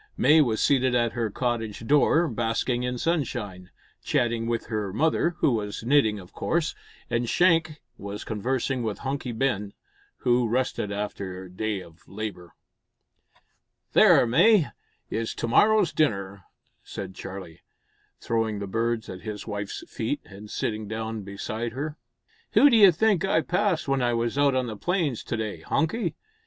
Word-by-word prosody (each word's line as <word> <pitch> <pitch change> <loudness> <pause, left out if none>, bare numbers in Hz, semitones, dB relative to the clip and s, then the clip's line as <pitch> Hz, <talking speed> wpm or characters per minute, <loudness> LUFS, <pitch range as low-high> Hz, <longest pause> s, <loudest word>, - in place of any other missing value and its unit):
May 155 +1 +6
was 115 -6 +1
seated 130 -3 +3
at 120 -1 +2
her 115 -3 -1
cottage 115 -1 -3
door, 150 +5 +4
basking 120 +1 -1
in 125 0 -2
sunshine, 120 - -2 0.3
chatting 115 -1 0
with 115 -1 -1
her 105 -3 -3
mother 160 - +1
who - - +4
was 105 -2 -3
knitting 120 -4 +3
of 90 -2 -14
course 165 -1 -1 0.3
and 120 -1 -1
Shank 165 -4 +3 0.2
was 100 +1 -6
conversing 125 +4 -1
with 110 -3 -2
Hunky 135 -2 -2
Ben, 110 -4 -1 0.4
who 120 -2 +2
rested 125 -4 -1
after 100 -2 -4
a 90 - -12
day 105 +1 -2
of 85 -1 -17
labour. 100 -4 -7 1.4
"There, - - +6
May, 170 - +4 0.4
is 115 0 -2
to - - -3
morrow's 210 - +4
dinner," 100 - -1 0.4
said 95 -1 -7
Charlie, 95 -4 -8 0.6
throwing 115 -2 -1
the 100 - -4
birds 115 +2 -1
at 90 0 -8
his 105 -2 -6
wife's 105 -2 -5
feet, - - -3
and 105 +2 -12
sitting 105 -1 -3
down 110 0 -4
beside 110 +4 -5
her. 150 +4 -5 0.5
"Who 290 - +7
d'you 210 -5 +8
think 195 +1 +2
I 195 -4 +2
passed 180 -1 0
when 135 -1 +1
I 120 -1 +1
was 115 +1 -1
out 140 -1 +3
on 130 -1 +1
the 110 -3 -5
plains 165 - -1
to 115 - -2
day, 110 -2 -4
Hunky? 170 +3 -1
115 Hz, 155 wpm, -26 LUFS, 105-140 Hz, 1.4 s, d'you